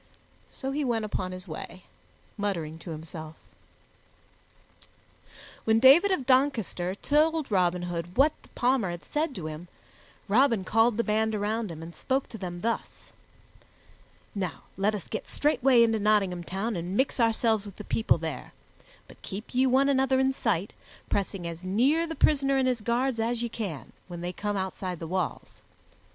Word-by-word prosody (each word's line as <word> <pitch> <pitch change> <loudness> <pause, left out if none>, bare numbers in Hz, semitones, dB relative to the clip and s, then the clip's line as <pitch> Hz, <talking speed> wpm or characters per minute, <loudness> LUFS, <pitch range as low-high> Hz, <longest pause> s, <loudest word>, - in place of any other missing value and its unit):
So 270 -1 -5
he 295 +2 -1
went 230 -4 0
upon 185 -3 -3
his 185 +1 -8
way, 175 +3 -8 0.5
muttering 170 -7 -3
to 170 - -9
himself. 160 0 -7 2.3
When 220 0 +3
David 275 - +7
of 370 -9 0
Doncaster 240 -9 +1
told 305 +3 +1
Robin 180 -2 +2
Hood 175 0 -5
what 290 +3 +5
the - - -20
Palmer 245 -5 +2
had 175 0 -6
said 300 -1 -1
to 175 - -6
him, 155 +3 -6 0.6
Robin 230 -1 +3
called 225 +3 +3
the 235 - +2
band 220 0 +1
around 215 +1 -1
him 165 -1 -7
and 170 +1 -9
spoke 265 - -1
to 225 - -9
them 175 -2 -5
thus: 230 +1 -4 1.2
"Now 185 -4 -4
let 205 +3 +1
us 200 - -6
get 215 - -5
straightway 270 -5 +4
into 225 -1 +2
Nottingham 200 -4 +1
Town 200 +5 -2
and 175 +3 -3
mix 265 0 +1
ourselves 225 -2 +2
with 200 - -10
the 210 - -8
people 220 - +2
there; - - -6 0.5
but - - -16
keep 200 +4 -7
ye 260 +1 +3
one 265 +2 +4
another 265 -1 +3
in 265 0 +2
sight, 205 -7 -1 0.4
pressing 195 -2 -1
as 170 +1 -6
near 265 - +2
the 325 - -5
prisoner 275 -3 +3
and 260 -1 +2
his 250 -3 0
guards 240 +2 0
as 235 +1 0
ye 235 - -2
can, 195 - -6
when 175 -2 -7
they 175 +1 -3
come 205 +1 -2
outside 190 -1 -3
the 165 - -6
walls. 180 0 -3
215 Hz, 170 wpm, -28 LUFS, 180-260 Hz, 2.3 s, David